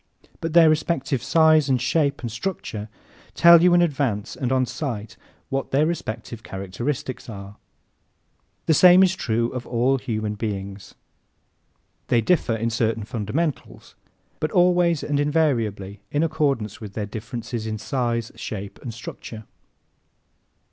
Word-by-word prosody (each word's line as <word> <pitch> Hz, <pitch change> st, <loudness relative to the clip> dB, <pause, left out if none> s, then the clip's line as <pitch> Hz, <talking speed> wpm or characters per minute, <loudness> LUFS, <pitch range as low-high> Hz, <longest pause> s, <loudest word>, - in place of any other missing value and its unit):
But 165 Hz, -1 st, -4 dB
their 170 Hz, -1 st, +7 dB
respective 150 Hz, -4 st, 0 dB
size, 155 Hz, +1 st, +4 dB
shape 140 Hz, +3 st, 0 dB
and 120 Hz, -2 st, -4 dB
structure 115 Hz, -, -5 dB, 0.5 s
tell 170 Hz, -1 st, +8 dB
you 175 Hz, 0 st, +5 dB
in 175 Hz, -, +5 dB
advance 135 Hz, -10 st, -1 dB
and 130 Hz, -2 st, -2 dB
on 130 Hz, -1 st, +2 dB
sight 115 Hz, -5 st, -5 dB, 0.3 s
what 135 Hz, 0 st, -2 dB
their 145 Hz, +3 st, +3 dB
respective 120 Hz, -8 st, -4 dB
characteristics 110 Hz, +8 st, -5 dB
are. 100 Hz, -1 st, -9 dB, 1.1 s
The 160 Hz, -, +3 dB
same 180 Hz, +3 st, +7 dB
is 190 Hz, -1 st, +3 dB
true 115 Hz, -6 st, -1 dB
of 125 Hz, -1 st, -6 dB
all 125 Hz, +3 st, +1 dB
human 110 Hz, -4 st, -3 dB
beings. 100 Hz, -2 st, -5 dB, 1.1 s
They 120 Hz, -, +3 dB
differ 120 Hz, -2 st, +1 dB
in 115 Hz, +1 st, -1 dB
certain 110 Hz, -1 st, 0 dB
fundamentals 130 Hz, +8 st, -4 dB, 0.5 s
but 155 Hz, -, -1 dB
always 175 Hz, -2 st, +3 dB
and 145 Hz, -1 st, 0 dB
invariably 115 Hz, -10 st, 0 dB
in 145 Hz, +2 st, 0 dB
accordance 140 Hz, -, -1 dB
with 105 Hz, -2 st, -8 dB
their 105 Hz, -1 st, -3 dB
differences 110 Hz, +1 st, -6 dB
in 110 Hz, 0 st, -3 dB
size, 120 Hz, -1 st, -2 dB
shape 100 Hz, -2 st, -7 dB
and 120 Hz, -, -6 dB
structure. 110 Hz, 0 st, -9 dB
125 Hz, 135 wpm, -23 LUFS, 110-155 Hz, 1.1 s, tell